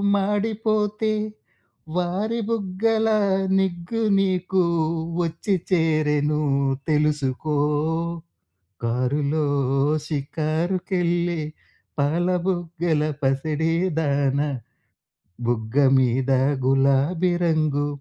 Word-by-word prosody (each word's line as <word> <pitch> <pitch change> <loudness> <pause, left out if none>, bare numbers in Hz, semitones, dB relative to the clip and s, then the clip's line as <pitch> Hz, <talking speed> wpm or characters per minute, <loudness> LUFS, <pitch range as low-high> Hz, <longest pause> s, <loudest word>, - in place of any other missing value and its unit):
మాడిపోతే, 210 +1 0 0.9
వారి 195 +6 -1
బుగ్గల 220 +1 0 0.5
నిగ్గు 190 +4 -2 0.2
నీకు 185 -1 +1 0.6
వచ్చి 165 +4 -1 0.2
చేరెను 155 -3 +1 0.5
తెలుసుకో, 150 -1 0 1.3
కారులో 140 +6 0 0.6
షికారుకెళ్ళె 170 +3 -1 0.6
పాలబుగ్గల 175 0 0 0.2
పసిడి 150 +4 0 0.3
దానా, 140 -1 +1 1.0
బుగ్గ 110 -1 -2 0.2
మీద 130 +1 +1 0.3
గులాబీ 140 +7 +2
రంగు 155 -3 +1
160 Hz, 55 wpm, -23 LUFS, 145-185 Hz, 1.3 s, గులాబీ